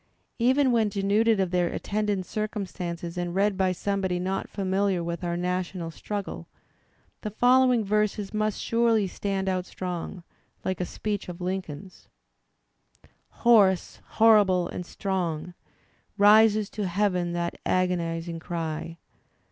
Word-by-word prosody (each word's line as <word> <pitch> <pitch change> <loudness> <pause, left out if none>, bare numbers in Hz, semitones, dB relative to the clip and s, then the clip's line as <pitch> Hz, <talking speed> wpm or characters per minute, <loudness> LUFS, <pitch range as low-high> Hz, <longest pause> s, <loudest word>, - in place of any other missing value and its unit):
Even 260 +3 +3
when 225 -3 +2
denuded 205 +2 +2
of 185 -2 0
their 180 -1 +2
attendant 205 0 -2
circumstances 180 -5 -4
and 175 0 -3
read 200 +1 +2
by 190 -1 +1
some 200 +2 -2
body 185 -2 0
not 190 +2 -3
famiUar 190 -2 0
with 170 +1 -4
our 170 0 -1
national 180 -1 -2
struggle, 205 +4 -5 0.7
the 215 - -3
follow 250 +4 +4
ing 235 -3 +2
verses 210 0 0
must 215 -1 -1
surely 230 -2 +2
stand 195 +1 -3
out 185 -1 -1
strong, 180 0 -5 0.4
like 185 -1 -1
a - - 0
speech 205 +1 -4
of 175 0 -7
Lincoln's: 185 -1 -5 1.4
Hoarse, 200 -6 +4 0.2
horrible 205 -6 +5
and 180 - -6
strong. 180 -4 -3 0.6
Rises 210 0 +6
to 210 -3 -3
Heaven 180 -2 0
that 170 0 -3
agonizing 170 -2 -1
cry. 165 0 -4
190 Hz, 130 wpm, -26 LUFS, 175-210 Hz, 1.4 s, Rises